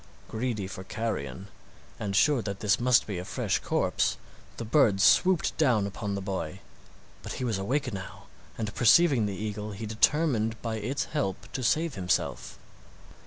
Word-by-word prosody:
Greedy 110 -3 -2
for 95 0 -7
carrion, 95 - -4 0.5
and 100 -2 -3
sure 140 +3 +4
that 100 -2 -5
this 105 -2 +2
must 125 0 +4
be 100 -4 -4
a - - -5
fresh - - -1
corpse, - - 0 0.4
the 115 - -5
bird 110 -5 +3
swooped 180 - +4
down 120 -10 +3
upon 100 0 -4
the 100 - -3
boy. 95 -2 -4 0.6
But - - -6
he - - -5
was 115 -6 -1
awake 125 +5 -1
now, 95 -1 -8 0.3
and 110 -2 -3
perceiving 125 -1 +5
the 100 - -4
eagle, 105 0 -4
he 100 +3 -6
determined 115 0 +1
by 115 -1 -2
its 125 +7 -2
help 100 -11 -3
to 130 - -4
save 155 +6 +1
himself. 90 -3 -2
110 Hz, 165 wpm, -28 LUFS, 100-125 Hz, 0.6 s, perceiving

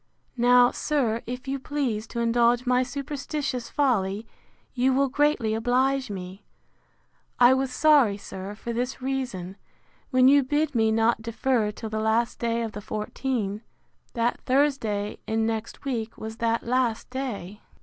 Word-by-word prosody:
Now, 245 +1 +5
sir, 240 -7 0
if 250 +2 -6
you 270 +1 -2
please 255 -7 -2
to 235 - -4
indulge 235 +1 +3
my 250 0 +3
superstitious 275 -1 -4
folly, 215 -7 0 0.5
you 260 +1 +2
will 275 0 +2
greatly 285 -5 +1
oblige 255 +3 +1
me. 190 0 -7 1.0
I 245 +1 +7
was 265 0 0
sorry, 275 -7 +4
sir, 195 0 -8
for 235 +2 -5
this 245 +2 -2
reason, 250 -9 -4 0.5
when 255 -2 +5
you 285 +1 +7
bid 290 +3 0
me 220 -2 +2
not 225 +1 +2
defer 230 0 0
till 215 +1 -7
the 220 - -1
last 220 +2 +1
day 235 0 0
of 225 - -4
the 210 - -7
fourteen, 215 0 -3 0.5
that 235 0 0
Thursday 255 -7 0
in 220 0 +1
next 225 +3 -4
week 230 -4 -3
was 220 0 -7
that 230 0 0
last 245 -1 0
day. 215 -7 -5
240 Hz, 150 wpm, -26 LUFS, 220-265 Hz, 1.0 s, I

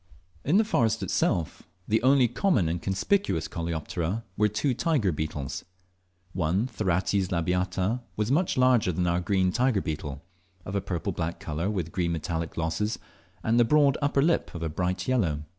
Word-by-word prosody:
In 155 +8 +3
the 220 - +5
forest 120 - +1
itself 80 -3 0 0.3
the 110 +1 +2
only 130 0 +5
common 120 - +1
and 85 +1 -2
conspicuous 195 - 0
coleoptera 85 +3 -3
were 105 - +3
two 110 +6 0
tiger 130 - +1
beetles. 75 -3 -4 0.7
One, 90 +5 +1
Therates 95 -4 0
labiata, 90 +6 0
was 105 +3 -1
much 170 +2 +1
larger 125 -6 +4
than 90 +1 -1
our 85 0 +1
green 95 0 +1
tiger 125 0 +2
beetle, 75 -4 -5 0.4
of 95 - -6
a 100 - 0
purple 90 -4 -3
black 85 0 -3
colour, 80 +5 -2
with 90 -6 -2
green 85 -2 0
metallic 80 0 -3
glosses, 85 +7 -1 0.5
and 115 +2 +2
the - - +7
broad 140 +2 +4
upper 140 -1 +2
lip 165 - +1
of 85 - -4
a 80 - -1
bright 90 +3 -2
yellow. 90 -13 +1
95 Hz, 165 wpm, -27 LUFS, 85-120 Hz, 0.7 s, the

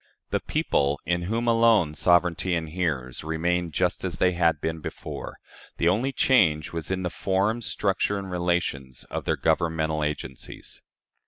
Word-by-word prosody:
The - - +1
people, 70 0 0
in 85 0 0
whom 115 +5 -1
alone 115 -8 +4
sovereignty 90 +2 +2
inheres, 80 -6 -2
remained 85 +1 -1
just 90 +4 0
as 90 -3 -3
they 90 - +3
had 85 -3 +2
been 80 +1 -3
before. - - -7 0.4
The 85 - +3
only 115 +9 +1
change 90 - +3
was 80 -1 -5
in 95 0 -1
the 90 - -2
form, 100 +5 0
structure, 100 -1 0
and 95 -1 -6
relations 85 -8 -2
of - - -4
their - - 0
governmental 80 -2 0
agencies. 75 -3 -6
85 Hz, 150 wpm, -26 LUFS, 80-95 Hz, 0.4 s, alone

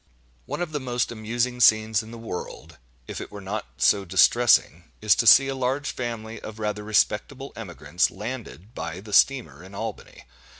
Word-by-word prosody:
One 175 - -3
of 165 - -6
the 150 - -2
most 125 -3 -2
amusing 120 +2 -2
scenes 110 -1 +4
in 110 - -12
the 115 - -9
world, 115 -6 -8 0.3
if - - -6
it - - -9
were 105 - -8
not 100 +2 -5
so 100 +11 +3
distressing, 95 -2 +3
is 105 -1 +4
to 115 - +1
see 135 +5 +8
a 135 - -2
large 135 +2 -2
family 115 -2 -6
of 110 - -9
rather 105 -1 -3
respectable 110 +6 0
emigrants 90 -3 -1
landed 110 -1 -8
by 85 -5 -6
the 105 0 -10
steamer 125 -4 +2
in 95 +2 -13
Albany. 110 0 -7
110 Hz, 175 wpm, -24 LUFS, 105-125 Hz, 0.3 s, see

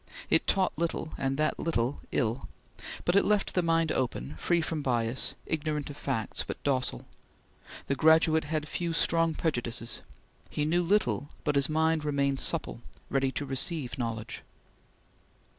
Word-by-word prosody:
It - - +4
taught 190 -1 +2
little, 165 -1 -2
and 135 0 -1
that 155 0 0
little 130 -5 0
ill, 120 0 -1 0.6
but 175 - +2
it 200 - +6
left 210 -1 +1
the 180 - +2
mind 165 -1 +2
open, 75 - -2
free 175 -1 +2
from 160 -1 -2
bias, 120 -2 +1
ignorant 150 -2 -2
of - - -10
facts, 120 -6 -2
but - - -5
docile. 130 - -1 0.8
The - - 0
graduate 160 +2 +4
had 155 0 -2
few 170 +2 -2
strong 165 0 +2
prejudices. 120 -6 -2 0.5
He 150 - -1
knew 170 +3 +2
little, 145 - +1
but 150 - 0
his 140 +1 +4
mind 160 0 +2
remained 140 -2 +1
supple, 160 -7 0 0.3
ready 135 -1 +2
to 145 - -2
receive 135 -1 -1
knowledge. 115 -2 -4
150 Hz, 150 wpm, -29 LUFS, 130-165 Hz, 0.8 s, it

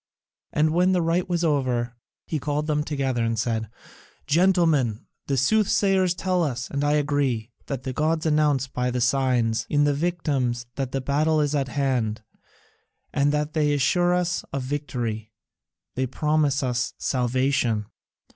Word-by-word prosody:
And 155 +1 +2
when 180 +2 +3
the 180 - +2
rite 170 +2 0
was 175 -1 0
over, 130 -6 0 0.3
he 155 - -2
called 145 +2 -2
them 150 -1 0
together 135 -5 -1
and 115 0 0
said: 110 -3 -1 0.6
"Gentlemen, 160 - +2 0.2
the 140 - 0
soothsayers 190 - +2
tell 185 -1 0
us, 125 -5 -2
and 140 0 -1
I 145 0 +2
agree, 140 -6 0 0.2
that 135 -3 -4
the 130 - -4
gods 155 +3 0
announce 150 -4 +2
by 125 -1 -2
the 125 0 -2
signs 125 -3 +1
in 145 0 +3
the 145 0 +3
victims 140 -7 -1
that 135 -2 -3
the 135 - -2
battle 155 +4 +1
is 145 -1 +1
at 140 -3 0
hand, 125 -5 -1 0.9
and 145 +1 +2
they 150 0 +1
assure 175 +7 +2
us 180 -1 -1
of 135 -2 -3
victory, 120 -6 -4 0.6
they 130 +1 -1
promise 150 +1 +1
us 125 -1 -1
salvation. 125 -3 0
140 Hz, 150 wpm, -24 LUFS, 125-155 Hz, 0.9 s, when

